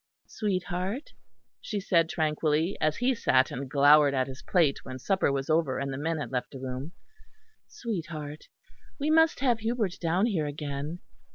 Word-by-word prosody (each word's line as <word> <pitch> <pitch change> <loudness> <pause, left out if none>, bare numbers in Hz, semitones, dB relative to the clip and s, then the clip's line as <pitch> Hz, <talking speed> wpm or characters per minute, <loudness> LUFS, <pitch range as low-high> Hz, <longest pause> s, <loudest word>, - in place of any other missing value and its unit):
"Sweetheart," 190 - -3 0.5
she 210 - -3
said 170 -4 +2
tranquilly, 155 +2 0
as 155 0 +1
he 250 +2 +2
sat 130 - +2
and 130 +1 -5
glowered 145 +1 +6
at 130 -1 +2
his 130 0 -9
plate 165 -7 +2
when 130 -1 -7
supper 190 +3 +1
was 135 -1 -2
over 155 -4 +1
and 140 0 -3
the - - -4
men 165 +2 -1
had 145 - -5
left 125 -1 -2
the 135 - -9
room, 130 +5 -5 0.7
"sweetheart, 160 - -6 0.5
we 295 +2 +1
must 320 -3 +4
have 245 -4 +2
Hubert 225 -4 -1
down 175 +4 +1
here 175 -10 0
again. 145 +3 -5
160 Hz, 165 wpm, -28 LUFS, 140-195 Hz, 0.7 s, glowered